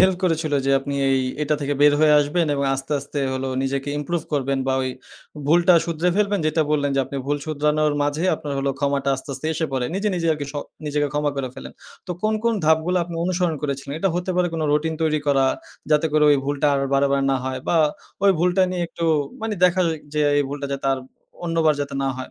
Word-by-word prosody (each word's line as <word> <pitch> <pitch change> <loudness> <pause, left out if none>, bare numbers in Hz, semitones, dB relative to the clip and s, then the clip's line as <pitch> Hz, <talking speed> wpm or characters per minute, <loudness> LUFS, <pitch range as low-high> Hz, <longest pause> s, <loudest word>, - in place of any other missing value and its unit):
help 190 0 +5
করেছিল 160 -3 0
যে - - +3
আপনি 140 +1 -4
এই 135 0 +3 0.2
এটা 150 +1 +1
থেকে 145 0 -1
বের 145 0 +7
হয়ে 155 -1 +5
আসবেন 160 +4 0
এবং 140 0 -1
আস্তে, 135 +2 -5
আস্তে 145 +1 -6
হলো 130 0 -2
নিজেকে 135 +1 -2
improve 165 +2 -2
করবেন 140 -1 0
বা 135 - +1
ওই 130 - -1 0.6
ভুলটা 175 +3 +5
শুধরে 170 +1 0
ফেলবেন, 205 -1 +1
যেটা 155 +1 +2
বললেন 145 -2 +1
যে - - +4
আপনি 140 - -7
ভুল 145 +1 +1
শুধরানোর 150 0 +1
মাঝে 145 +4 -1
আপনার 150 -2 -6
হলো 135 0 0
ক্ষমাটা 140 -1 0
আস্তে, 130 - -11
আস্তে 155 - -6
এসে 160 +1 -1
পড়ে। 130 -2 0
নিজে, 205 +2 0
নিজে 170 -2 -1
আরকি 150 -2 -4
স - - -26 0.3
নিজেকে 145 0 0
ক্ষমা 150 0 0
করে 135 -2 -3
ফেলেন। - - -9 0.3
তো - - -7
কোন, 215 0 +2
কোন 230 - +3
ধাপগুলা 160 +3 +3
আপনি 170 0 -8
অনুসরণ 180 -2 0
করেছিলেন? 140 -1 -3
এটা 195 +3 +1
হতে 180 +1 -2
পারে 180 -1 +3
কোনো 160 -1 -1
রুটিন 160 +2 +1
তৈরি 155 -1 +2
করা, 135 -2 +3 0.4
যাতে 150 +1 +4
করে 155 0 +4
ওই 145 - +5
ভুলটা 145 +1 0
আর 140 - +1
বারে, 140 +1 +3
বারে 140 0 +1
না - - +2
হয় 130 0 -3
বা 170 - +2 0.5
ওই 200 - +7
ভুলটা 180 +3 +3
নিয়ে 180 -1 -2
একটু 170 - -5 0.4
মানে 225 -1 -1
দেখা 180 +1 +3 0.3
যে 150 - +1 0.2
এই - - +3
ভুলটা 140 0 -4
যাতে 135 0 -3
আর 135 - -1 0.5
অন্যবার 165 -2 +2
যাতে 140 0 -6
না - - +1
হয়। 130 - -7
150 Hz, 225 wpm, -22 LUFS, 140-170 Hz, 0.6 s, বের